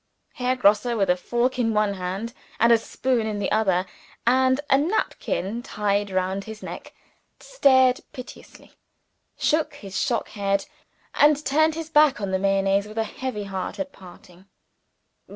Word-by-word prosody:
Herr 255 0 0
Grosse 210 -3 +3
with 195 -4 +2
a - - +3
fork 240 +7 -1
in 225 -2 +1
one 210 -1 +2
hand 195 +5 -4 0.3
and 235 +1 +5
a 230 - +7
spoon 240 0 -1
in 210 -1 -3
the 205 - -2
other, 190 -4 +2 0.4
and 260 +2 +3
a - - +4
napkin 270 - -1
tied 205 -4 -1
round 190 +1 -2
his 220 0 -9
neck - - -9 0.4
stared 260 - +3
piteously; 255 -1 -12 0.7
shook 305 -1 0
his 195 -8 -5
shock 235 -3 -1
head; 200 -1 -1 0.5
and 300 0 +3
turned 315 +3 +2
his 325 0 -6
back 300 -6 +5
on 200 -2 -3
the 190 - 0
Mayonnaise, 195 +1 +1
with 215 +1 -11
a 225 - +2
heavy 220 -1 -5
heart 190 -2 -5
at 285 -1 -4
parting. 180 -1 -16
220 Hz, 155 wpm, -24 LUFS, 195-260 Hz, 0.7 s, a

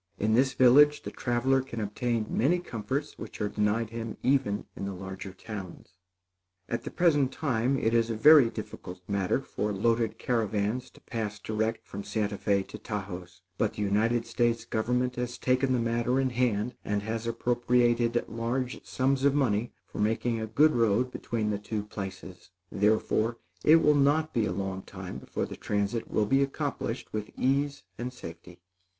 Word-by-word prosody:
In 110 +1 +1
this 130 +3 +3
village, 145 +4 +6
the - - -5
traveler 130 +2 +1
can 130 -3 -7
obtain 110 +2 -1
many 155 +9 +2
comforts 135 -1 -4
which - - -8
are 105 - 0
denied 105 +2 0
him 115 -1 -5
even 130 -6 +1
in - - -5
the 100 -1 -4
larger 95 +1 -7
towns. 95 -1 -8 0.8
At 120 - -3
the - - -3
present 145 -7 +3
time 135 -3 0
it 115 -3 +1
is 115 0 +3
a 115 - -1
very 145 +1 +7
difficult 90 -4 -8
matter 100 +5 0
for 105 -5 -3
loaded 115 +3 +1
caravans 115 +1 -1
to - - -20
pass 105 -3 -4
direct 110 +2 -2
from 100 +1 -7
Santa 105 -2 -1
Fé 100 -2 +1
to - - -8
Taos; 95 -3 -6 0.2
but 110 - +1
the 105 - -2
United 110 +4 +1
States 120 -1 0
government 125 +3 0
has 125 0 -3
taken 130 +1 +1
the 130 - +3
matter 120 +2 +1
in 130 -1 +1
hand 120 -2 0
and 105 0 -1
has 115 +1 -3
appropriated 120 0 +2
large 120 +3 -3
sums 130 +1 0
of 140 0 +4
money 120 -5 +1
for - - -9
making 115 +2 +1
a 110 - -3
good 150 +8 +4
road 115 +1 +2
between 110 -4 -2
the 100 - -2
two 105 0 -3
places; 95 -3 -8 0.2
therefore, 110 +2 +1 0.3
it 155 - +7
will 150 -2 +5
not 145 +2 +2
be 110 -3 +1
a - - -2
long 95 0 -3
time 95 -1 -8
before - - -3
the - - -8
transit 105 +2 -2
will 105 - +1
be 135 +6 +3
accomplished 140 -3 -3
with 105 -1 -3
ease 140 +2 0 0.2
and 125 +1 -3
safety. 85 -6 -11
115 Hz, 175 wpm, -28 LUFS, 105-125 Hz, 0.8 s, very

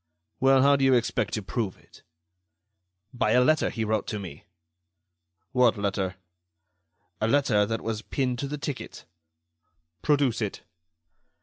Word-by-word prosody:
"Well, 135 0 +5
how 140 0 +5
do 135 - -1
you 135 -1 +5
expect 120 -1 0
to 110 - -4
prove 100 -1 -3
it?" - - -20 1.1
"By 125 - +1
a 125 - +5
letter 155 +3 +3
he 110 -2 -3
wrote 110 -1 -1
to 105 - -3
me." 85 -7 -9 1.1
"What 125 -3 +3
letter?" 100 -2 -2 1.1
"A 110 - +2
letter 115 -6 +3
that 115 +1 -2
was 110 -1 -3
pinned 125 0 -2
to 140 - -2
the 150 +2 -4
ticket." 145 -1 -6 1.0
"Produce 140 -6 +2
it." 105 -2 -4
120 Hz, 140 wpm, -26 LUFS, 105-135 Hz, 1.1 s, Well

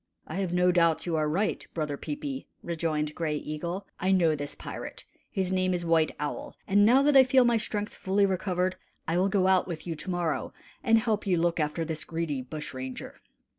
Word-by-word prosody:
"I 160 - -6
have 190 -3 -1
no 180 0 +4
doubt 170 -2 +3
you 170 -2 -1
are 155 -1 +1
right, 195 +7 0
Brother 150 -3 -1
Peepi," 285 - -5 0.2
rejoined 155 -3 -1
Gray 155 -2 -1
Eagle. 170 +6 -4
"I 185 +1 +1
know 170 -5 +4
this 145 -1 -5
pirate - - -7 0.2
his 190 -1 -1
name 185 -1 +1
is 175 -1 -3
White 165 -1 +3
Owl; 150 0 -4
and 205 +1 +5
now 250 +6 +6
that 290 0 +4
I 265 - +10
feel 255 0 +4
my 240 -1 +4
strength 210 -1 -3
fully 195 +1 +1
recovered, 185 -1 0 0.3
I 165 +2 +1
will 190 +2 +3
go 195 -2 +2
out 190 -1 +4
with 170 -3 -6
you 165 -2 -3
to 185 - -7
morrow 175 -3 -1 0.3
and 225 -3 +5
help 220 -2 0
you 180 -2 +3
look 170 0 +1
after 155 +2 -1
this 160 -1 -3
greedy 160 -5 -3
bush 150 +4 -7
ranger." 130 0 -7
175 Hz, 210 wpm, -28 LUFS, 160-195 Hz, 0.3 s, I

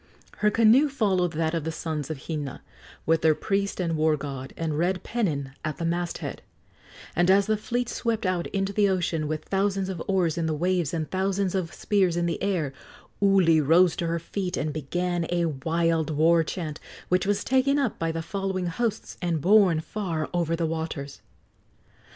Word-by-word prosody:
Her 210 - +3
canoe 230 +7 +5
followed 190 - +1
that 160 +1 0
of 165 -2 -1
the 160 - -2
sons 155 -3 -4
of 150 -5 -6
Hina, 150 -5 -4 0.4
with 165 0 +2
their 155 -1 +4
priest 200 +2 -1
and 170 -3 0
war 155 0 +2
god, 135 -2 -6
and 160 -2 -2
red 180 +4 0
pennon 155 - -1
at 155 -1 -3
the 165 - -3
masthead; 170 +1 -3 0.7
and 175 +2 +3
as 195 +1 +5
the 215 - +2
fleet 240 +3 -2
swept 230 -3 -2
out 180 -2 0
into 195 0 -2
the 205 -1 +3
ocean, 170 -4 0
with 155 0 -3
thousands 195 -1 0
of 180 -4 -4
oars 180 -4 +1
in 165 - 0
the 155 - 0
waves 175 -1 0
and 155 -4 -3
thousands 190 0 0
of 185 -4 -1
spears 190 -5 +1
in 175 - +1
the 170 -1 -2
air, 175 -9 -1 0.5
Uli 185 -5 +5
rose 165 +3 +4
to 170 - -1
her 165 0 0
feet 180 +2 -3
and 150 0 -2
began 175 +3 -2
a 175 -1 +1
wild 160 +2 0
war 165 +2 +4
chant, 160 -2 -5 0.3
which 180 +1 +2
was 205 0 +1
taken 265 +2 +2
up 270 -6 -1
by 165 0 0
the 165 0 -4
following 190 +1 -2
hosts 215 +6 -3
and 170 -3 0
borne 190 -1 +5
far 165 -4 -3
over 170 -2 +1
the 165 0 -1
waters. 160 -3 -4
170 Hz, 185 wpm, -26 LUFS, 160-195 Hz, 0.7 s, canoe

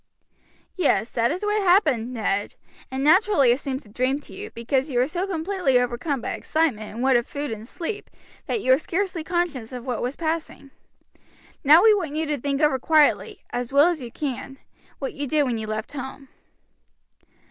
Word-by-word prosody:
"Yes, 235 - +1
that 235 -1 +1
is 365 +7 -2
what 420 0 +1
happened, 310 - +3
Ned, 205 -4 -2 0.3
and 265 +1 -3
naturally 315 - +5
it 245 - +1
seems 270 -2 -4
a - - -16
dream 255 +6 0
to - - -11
you, - - -7
because 260 +5 -1
you 250 - -2
were 250 +2 +3
so 355 +5 -2
completely 355 -6 +1
overcome 245 +3 -2
by - - -3
excitement 275 -10 -1
and 235 +4 -5
want 260 -2 +4
of 240 - -7
food 290 -2 -4
and 220 0 -7
sleep 380 - -5 0.4
that 445 - -1
you 260 - +2
were 260 - +6
scarcely 360 0 -2
conscious 325 -9 -2
of 250 -1 -7
what 250 -3 -2
was 250 +3 -2
passing. 320 -4 -4 0.9
Now 305 +5 +7
we 440 -1 +7
want 335 -8 -2
you 320 +1 0
to 295 -2 -2
think 280 +1 -1
over 295 -3 +3
quietly, 305 +2 +2
as 245 0 -3
well 285 +5 +6
as 335 -5 -2
you 240 -2 -7
can, 270 -1 -5 0.4
what 270 - -4
you 285 0 -4
did 300 +1 +2
when 245 -4 -1
you 215 - -5
left 215 +1 -4
home." 265 0 -7
280 Hz, 195 wpm, -24 LUFS, 245-325 Hz, 0.9 s, Now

